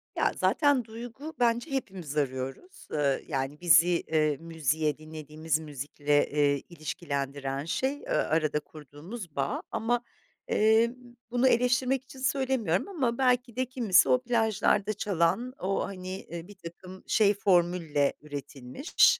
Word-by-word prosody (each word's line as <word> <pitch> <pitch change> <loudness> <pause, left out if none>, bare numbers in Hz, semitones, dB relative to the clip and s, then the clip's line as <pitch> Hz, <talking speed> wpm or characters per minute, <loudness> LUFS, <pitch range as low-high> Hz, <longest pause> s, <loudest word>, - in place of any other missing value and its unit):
Ya, - - +2
zaten 285 -6 +3
duygu, 240 +7 -8
bence 240 +4 +1
hepimiz 190 - -4
arıyoruz. 135 - -3
Iıı, 140 -3 +1
yani, 135 +1 -3
bizi, 170 -1 +6
eee, 155 -4 +1
müziğe 155 -2 -1
dinlediğimiz 155 0 -3
müzikle, 145 0 0
eee, 145 -1 +2
ilişkilendiren, 140 -4 -4
şey, 265 +11 0
ııı, - - -11 0.2
arada 155 -1 +1
kurduğumuz 155 - -10
bağ. 135 0 -1
Ama, 240 +2 0 0.5
eee, 220 +2 +4 0.4
bunu 245 +1 +3
eleştirmek 250 +2 +2
için 265 0 -13
söylemiyorum 260 - 0
ama 260 -11 -1
belki 250 -2 +2
de 255 +1 0
kimisi 230 -8 +3
o 255 - +4
plajlarda 220 -3 +2
çalan, 205 +6 0
o, 195 +1 0
hani, 185 -1 -6
eee, 170 0 -8
birtakım 185 -1 -11
şey 210 -2 +4
formülle 175 -7 +2
üretilmiş, 145 - +1
180 Hz, 125 wpm, -28 LUFS, 150-240 Hz, 0.5 s, bizi